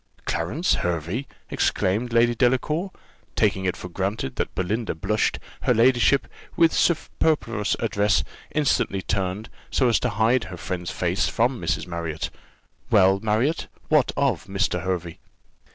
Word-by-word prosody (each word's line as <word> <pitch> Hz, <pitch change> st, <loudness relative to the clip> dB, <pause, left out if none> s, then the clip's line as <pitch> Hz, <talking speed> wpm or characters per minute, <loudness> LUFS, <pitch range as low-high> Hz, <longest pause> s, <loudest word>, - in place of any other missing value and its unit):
"Clarence 140 Hz, -, 0 dB
Hervey!" 90 Hz, -, -2 dB, 0.2 s
exclaimed 110 Hz, +6 st, 0 dB
Lady 120 Hz, +1 st, +4 dB
Delacour: 130 Hz, -, +1 dB, 0.5 s
taking 95 Hz, -, +1 dB
it 90 Hz, -, -1 dB
for -, -, -7 dB
granted 95 Hz, -3 st, -3 dB
that -, -, -2 dB
Belinda 105 Hz, +3 st, -1 dB
blushed, 105 Hz, +7 st, 0 dB, 0.2 s
her -, -, +2 dB
ladyship, 125 Hz, +3 st, +4 dB, 0.3 s
with 165 Hz, -1 st, +4 dB
superfluous 145 Hz, -, +1 dB
address, 100 Hz, -, +2 dB, 0.3 s
instantly 135 Hz, -9 st, 0 dB
turned, 95 Hz, +2 st, -2 dB, 0.2 s
so 130 Hz, -, +2 dB
as 115 Hz, -, +3 dB
to -, -, 0 dB
hide 115 Hz, +2 st, +2 dB
her 90 Hz, -1 st, -8 dB
friend's 90 Hz, 0 st, -4 dB
face -, -, 0 dB
from -, -, 0 dB
Mrs. -, -, -1 dB
Marriott. 85 Hz, -3 st, -4 dB, 0.6 s
"Well, 95 Hz, -1 st, +5 dB
Marriott, 110 Hz, +9 st, 0 dB, 0.2 s
what 150 Hz, -4 st, +4 dB
of 140 Hz, -2 st, +1 dB
Mr. 95 Hz, -3 st, -1 dB
Hervey?" 90 Hz, -2 st, -3 dB
105 Hz, 135 wpm, -24 LUFS, 90-125 Hz, 0.6 s, Well